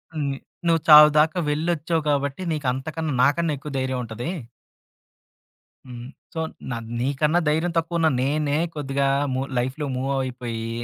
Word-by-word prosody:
హ్మ్. 145 Hz, -3 st, -1 dB, 0.3 s
నువ్వు 165 Hz, -1 st, +3 dB
చావుదాకా 150 Hz, +2 st, +7 dB
వెళ్ళొచ్చావు 160 Hz, +1 st, 0 dB
కాబట్టి 140 Hz, +2 st, -1 dB
నీకు 150 Hz, -4 st, -2 dB
అంతకన్నా 155 Hz, +3 st, -4 dB
నాకన్నా 155 Hz, +3 st, +2 dB
ఎక్కువ 145 Hz, +2 st, -8 dB
ధైర్యం 130 Hz, -1 st, -2 dB
ఉంటది. 115 Hz, +5 st, -5 dB, 1.6 s
హ్మ్. 120 Hz, -1 st, -8 dB, 0.3 s
సో 165 Hz, -, -4 dB, 0.3 s
న -, -, -1 dB, 0.3 s
నీకన్నా 145 Hz, +6 st, +1 dB
ధైర్యం 160 Hz, +3 st, +1 dB
తక్కువున్న 165 Hz, 0 st, +1 dB
నేనే 145 Hz, +2 st, 0 dB, 0.2 s
కొద్దిగా 140 Hz, -1 st, -1 dB, 0.3 s
మూ 130 Hz, -, -1 dB, 0.2 s
లైఫ్‌లో 130 Hz, +5 st, -2 dB
మూవ్ 130 Hz, +2 st, -2 dB
అయిపోయి. 120 Hz, -3 st, -5 dB
145 Hz, 125 wpm, -23 LUFS, 130-160 Hz, 1.6 s, చావుదాకా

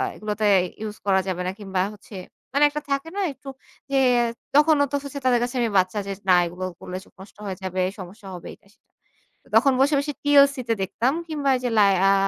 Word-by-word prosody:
এগুলাতে 210 Hz, 0 st, -3 dB, 0.4 s
ইউস 215 Hz, -1 st, -5 dB
করা 195 Hz, -1 st, +3 dB
যাবে 180 Hz, -1 st, -2 dB
না -, -, -1 dB
কিংবা 190 Hz, -2 st, -2 dB
হচ্ছে 205 Hz, +1 st, -14 dB, 0.4 s
মানে 285 Hz, +1 st, +3 dB
একটা 300 Hz, +1 st, -5 dB
থাকে 275 Hz, +4 st, -1 dB
না? -, -, 0 dB
একটু 275 Hz, 0 st, -11 dB, 0.4 s
যে, 275 Hz, -, +2 dB, 0.6 s
তখনও 295 Hz, -1 st, +5 dB
তো -, -, 0 dB
হচ্ছে 280 Hz, 0 st, -6 dB
তাদের 245 Hz, -2 st, +4 dB
কাছে 245 Hz, +1 st, -4 dB
আমি 235 Hz, -, +1 dB
বাচ্চা 185 Hz, +3 st, +1 dB
যে, -, -, -3 dB, 0.2 s
না -, -, +7 dB
এগুলো 180 Hz, +2 st, -5 dB
করলে 180 Hz, -, -6 dB
চোখ -, -, -24 dB
নষ্ট 190 Hz, +2 st, -13 dB
হয়ে 190 Hz, -2 st, -4 dB
যাবে, 185 Hz, 0 st, -2 dB, 0.2 s
সমস্যা 195 Hz, +3 st, -10 dB
হবে 175 Hz, -, -10 dB
এইটা -, -, -21 dB
সেটা। -, -, -40 dB, 0.7 s
তখন 275 Hz, -, +5 dB
বসে, 285 Hz, +3 st, +4 dB
বসে, 290 Hz, +1 st, -2 dB
টিওসি 280 Hz, -1 st, +5 dB
তে 230 Hz, -, +3 dB
দেখতাম। 225 Hz, +7 st, 0 dB, 0.2 s
কিংবা 290 Hz, -3 st, -1 dB
এইযে 250 Hz, -1 st, -2 dB
'লায়আ' 195 Hz, -1 st, +4 dB
220 Hz, 200 wpm, -23 LUFS, 190-280 Hz, 0.7 s, না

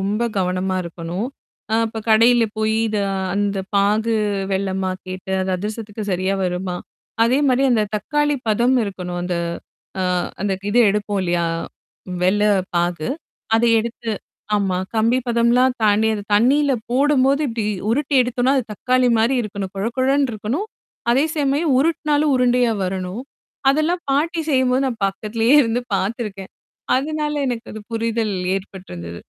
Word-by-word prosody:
ரொம்ப 205 Hz, +4 st, -1 dB, 0.2 s
கவனமா 185 Hz, +1 st, 0 dB
இருக்கணும். 170 Hz, +5 st, -4 dB, 0.5 s
அ -, -, +3 dB
அப்ப 225 Hz, 0 st, -6 dB
கடையில 230 Hz, +2 st, +5 dB
போயி 220 Hz, 0 st, +1 dB
இத 210 Hz, -1 st, -1 dB, 0.4 s
அந்த 205 Hz, -1 st, 0 dB, 0.2 s
பாகு 215 Hz, +3 st, +2 dB, 0.4 s
வெல்லமா 190 Hz, -1 st, -1 dB, 0.2 s
கேட்டு, 185 Hz, 0 st, -7 dB
அந்த 185 Hz, -, -1 dB
அதிரசத்துக்கு 215 Hz, +1 st, -5 dB
சரியா 185 Hz, +2 st, 0 dB
வருமா? 180 Hz, 0 st, -2 dB, 0.5 s
அதே 255 Hz, +4 st, +3 dB
மாரி 255 Hz, +1 st, +3 dB
அந்த 220 Hz, -3 st, +3 dB
தக்காளி 295 Hz, +7 st, 0 dB
பதம் 240 Hz, +4 st, +3 dB
இருக்கணும் 180 Hz, -3 st, -5 dB
அந்த 180 Hz, 0 st, -2 dB, 0.7 s
அ -, -, +1 dB, 0.4 s
அந்த 200 Hz, -1 st, 0 dB, 0.2 s
இது 240 Hz, -, +2 dB
எடுப்போம் 205 Hz, -1 st, -1 dB
இல்லையா? 175 Hz, -1 st, 0 dB, 0.8 s
வெல்ல 200 Hz, +3 st, +3 dB, 0.3 s
பாகு. 175 Hz, -2 st, 0 dB, 0.5 s
அத 225 Hz, -, +3 dB
எடுத்து 230 Hz, 0 st, -4 dB, 0.5 s
ஆமா 190 Hz, -3 st, 0 dB, 0.2 s
கம்பி 230 Hz, +3 st, +3 dB
பதம்லாம் 240 Hz, +2 st, +3 dB
தாண்டி, 215 Hz, +1 st, +3 dB
அது 205 Hz, -, -4 dB
தண்ணீல 275 Hz, +6 st, +4 dB, 0.2 s
போடும்போது 275 Hz, +1 st, +3 dB
இப்டி 225 Hz, -2 st, -3 dB, 0.3 s
உருட்டி 285 Hz, +3 st, 0 dB
எடுத்தோனா 250 Hz, +2 st, +1 dB
அது 255 Hz, -, +1 dB
தக்காளி 255 Hz, +4 st, +2 dB
மாரி 235 Hz, +4 st, +3 dB
இருக்கணும். 200 Hz, -3 st, -5 dB
கொழகழன்னு 260 Hz, +6 st, +1 dB
இருக்கணும். 230 Hz, -, -3 dB, 0.5 s
அதே 270 Hz, +5 st, +3 dB
சமயம் 285 Hz, 0 st, +1 dB
உருட்னாலும் 300 Hz, -1 st, +2 dB
உருண்டையா 245 Hz, -1 st, +3 dB
வரணும். 185 Hz, +4 st, -4 dB, 0.5 s
அதெல்லாம் 315 Hz, +5 st, 0 dB
பாட்டி 325 Hz, +4 st, +1 dB
செய்யும்போது 260 Hz, -1 st, +2 dB
நான் 235 Hz, -5 st, -4 dB
பக்கத்திலேயே 225 Hz, +6 st, +1 dB
இருந்து 235 Hz, +1 st, -1 dB
பாத்துருக்கேன். 195 Hz, 0 st, -3 dB, 0.5 s
அதனால 300 Hz, +1 st, -2 dB
எனக்கு 240 Hz, -2 st, -4 dB
அது 215 Hz, -, -7 dB
புரிதல் 225 Hz, -2 st, -1 dB, 0.2 s
ஏற்பட்டிருந்தது. 90 Hz, -, -8 dB
225 Hz, 135 wpm, -20 LUFS, 195-255 Hz, 0.8 s, கடையில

